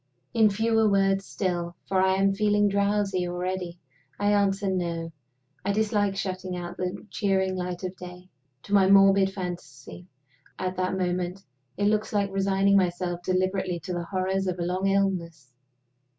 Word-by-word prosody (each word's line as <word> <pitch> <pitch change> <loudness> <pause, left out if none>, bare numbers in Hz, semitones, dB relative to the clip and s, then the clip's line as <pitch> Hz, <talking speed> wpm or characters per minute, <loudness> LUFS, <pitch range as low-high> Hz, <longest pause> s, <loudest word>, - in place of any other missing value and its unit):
In 220 -2 +5
fewer 220 +1 +2
words 195 0 +2
still 175 -3 -2
for 190 -1 +1
I 190 0 +3
am 195 +1 +2
feeling 205 0 +2
drowsy 200 -2 +1
already 180 0 -3 0.4
I 205 0 +2
answer 200 0 +1
No. 170 -3 -2 0.5
I 200 - 0
dislike 205 -1 +1
shutting 185 -1 -3
out 175 0 -6
the 180 +3 -4
cheering 190 -2 0
light 180 0 -4
of 185 0 -4
day. 180 0 -10 0.4
To 200 - -6
my 195 -2 +5
morbid 195 0 +6
fancy, 175 -4 -7 0.5
at 185 0 -3
that 185 +1 -1
moment, 180 +1 -2 0.3
it 205 - 0
looks 215 +1 +1
like 200 -1 +1
resigning 195 0 +3
myself 175 -1 -1
deliberately 185 0 -1
to 185 - -5
the 175 -1 -3
horrors 190 +1 -1
of 180 -1 -2
a 175 - -2
long 185 +2 -1
illness. 170 -8 -1
190 Hz, 155 wpm, -26 LUFS, 180-200 Hz, 0.5 s, morbid